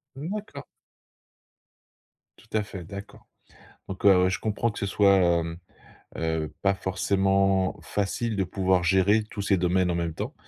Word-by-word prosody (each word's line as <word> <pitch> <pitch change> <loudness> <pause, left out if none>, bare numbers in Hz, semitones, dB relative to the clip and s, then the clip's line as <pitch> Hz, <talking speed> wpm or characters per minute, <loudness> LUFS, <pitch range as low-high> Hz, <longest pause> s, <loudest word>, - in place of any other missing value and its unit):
Mmh 150 +6 -6
d'accord. 145 -10 -8 1.7
Tout - - -20
à 105 - 0
fait 95 -3 -8
d'accord. 100 +4 -10 0.6
Donc, 95 +1 -6
heu, 95 -2 +6
je 95 - -2
comprends 110 +2 -1
que 105 - -7
ce 100 - -1
soit, 100 0 +4
hem, 85 -2 +1 0.6
heu, 80 -1 -2
pas 100 0 +3
forcément 95 0 +1
facile 105 +3 -2
de 95 - +1
pouvoir 95 0 +1
gérer 95 +5 +3
tous 100 - -5
ces 100 -1 +2
domaines 90 0 +1
en - - -1
même 85 -2 -2
temps - - -5
95 Hz, 155 wpm, -26 LUFS, 90-100 Hz, 1.7 s, heu